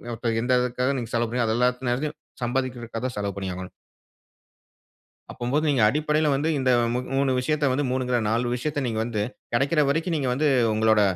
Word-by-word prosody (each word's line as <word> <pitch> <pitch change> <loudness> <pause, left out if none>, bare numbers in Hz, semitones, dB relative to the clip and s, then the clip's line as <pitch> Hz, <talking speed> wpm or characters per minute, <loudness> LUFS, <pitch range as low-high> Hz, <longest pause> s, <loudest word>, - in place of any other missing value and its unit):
இப்ப 115 -1 -2
எந்த 125 0 +3
இதுக்காக 125 +2 0
நீங்க 115 -1 -6
செலவு 115 -1 +1
பண்ணு 120 -1 +1
அது 110 - +1
எல்லாத்தயும், 125 +4 0 0.3
சம்பாதிகுறதுக்காக 120 -2 -3
தான் 120 - -7
செலவு 100 -1 -3
பண்ணியாகணும். 95 -1 -5 1.6
அப்பம்போது, 135 +6 -1
நீங்க 135 -5 +2
அடிப்படையில 150 +2 +1
வந்து 150 +4 0
இந்த 130 -1 +2 0.2
மு 125 - 0 0.2
3 135 -1 +2
விஷயத்த 145 +1 +1
வந்து, 140 +2 0
3ங்க 130 -1 -1
இல்ல 120 - +3
4 120 +2 0
விஷயத்த 145 +2 -2
நீங்க 110 -1 -2
வந்து, 110 -3 -2 0.3
கிடைக்கிற 145 +5 +2
வரைக்கும் 165 +3 0
நீங்க 135 -3 -1
வந்து, 150 +4 +1 0.3
உங்களோட 110 -1 +3
125 Hz, 170 wpm, -25 LUFS, 115-140 Hz, 1.6 s, எந்த